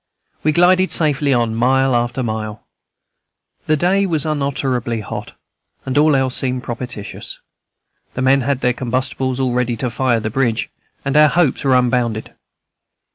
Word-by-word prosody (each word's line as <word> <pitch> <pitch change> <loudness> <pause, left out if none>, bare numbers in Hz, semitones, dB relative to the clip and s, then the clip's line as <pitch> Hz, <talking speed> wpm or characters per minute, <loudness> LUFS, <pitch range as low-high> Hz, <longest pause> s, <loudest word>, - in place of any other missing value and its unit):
We 155 - +2
glided 185 +3 +3
safely 145 -3 +1
on, 120 -3 +1
mile 130 +3 +2
after 120 +2 -1
mile. 110 -2 -4 1.0
The 155 - +3
day 195 +5 +2
was 160 -4 0
unutterably 135 -6 -1
hot, 105 - -7 0.5
but 130 -1 -3
all 150 0 +4
else 130 -1 +1
seemed 130 -1 -1
propitious. 120 -3 -6 0.8
The 125 - -2
men 135 +1 +4
had 135 +1 -1
their 125 - +2
combustibles 130 +1 -2
all 130 -2 0
ready 125 -1 0
to 125 +2 -2
fire 120 0 +1
the 110 0 -4
bridge, 120 -2 -1 0.3
and 135 0 -1
our 150 0 +7
hopes 165 -6 +1
were 135 -2 +3
unbounded. 120 -3 0
130 Hz, 150 wpm, -18 LUFS, 120-140 Hz, 1.0 s, our